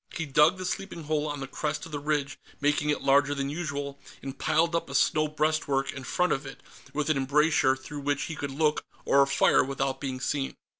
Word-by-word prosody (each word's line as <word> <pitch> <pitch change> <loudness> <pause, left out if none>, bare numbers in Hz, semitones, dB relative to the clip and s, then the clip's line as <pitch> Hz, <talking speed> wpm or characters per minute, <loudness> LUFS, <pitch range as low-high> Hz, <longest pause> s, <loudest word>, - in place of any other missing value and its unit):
He 165 - -2
dug 150 +5 +4
the 185 - -5
sleeping 180 -2 -4
hole 155 0 -1
on 145 -1 -4
the 135 - -4
crest 150 +2 -3
of 165 - -11
the 145 - -3
ridge, 145 -2 -1 0.2
making 145 +1 +1
it 150 - 0
larger 140 +1 +4
than 140 0 -2
usual, 145 -3 -4 0.2
and 135 0 -5
piled 160 +4 +1
up 170 - -1
a 140 - -5
snow 155 +3 +3
breastwork 150 -3 0
in 130 - -7
front 180 +6 +1
of 135 - -2
it, 135 -1 -10 0.3
with 150 +1 0
an 150 - +1
embrasure 140 0 +3
through 140 +2 -8
which 145 0 -1
he 160 - -5
could 145 - -4
look 150 +2 +1 0.2
or 140 0 +5
fire 140 0 +4
without 135 0 -2
being 130 -2 -3
seen. 135 +1 -2
145 Hz, 215 wpm, -28 LUFS, 135-155 Hz, 0.3 s, or